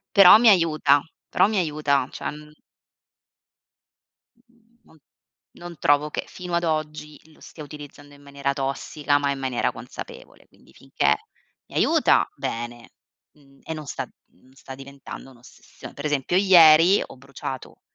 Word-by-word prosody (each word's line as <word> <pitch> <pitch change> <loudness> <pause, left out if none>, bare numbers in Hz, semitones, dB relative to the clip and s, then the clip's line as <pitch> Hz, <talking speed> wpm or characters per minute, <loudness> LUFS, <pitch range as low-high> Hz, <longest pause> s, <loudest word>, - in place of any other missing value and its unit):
Però 200 +1 +9
mi 230 +1 +5
aiuta, 155 -6 +3 0.3
però 185 - +3
mi 215 0 -2
aiuta, 150 -6 0
cioè, - - -5
mhmm 150 0 -13 1.9
Mhmm, 235 -1 -33
non 160 - -23 0.6
non 175 0 -10
trovo 145 +1 +2
che - - -4
fino 180 -1 -9
ad 170 0 +1
oggi 155 -2 -4
lo 155 - -23
stia 155 - -12
utilizzando 145 -1 -12
in 145 - -18
maniera 140 -1 -3
tossica, 140 +1 -2
ma 140 -1 -1
in 140 - -4
maniera 130 -2 -1
consapevole, - - -11
quindi - - -24
finché - - 0 0.5
mi - - -15
aiuta - - +3
bene, 120 +1 -6 0.4
mhmm, 140 -2 -24
e 160 - -5
non 155 -1 -8
sta - - -5 0.3
non 130 +9 -25
sta 135 0 -11
diventando 135 0 -11
un'ossessio 120 -1 -15
pre - - -8
esempio 145 +4 0
ieri 175 -1 +6
ho - - -14
bruciato 135 0 -8
150 Hz, 145 wpm, -23 LUFS, 140-165 Hz, 1.9 s, Però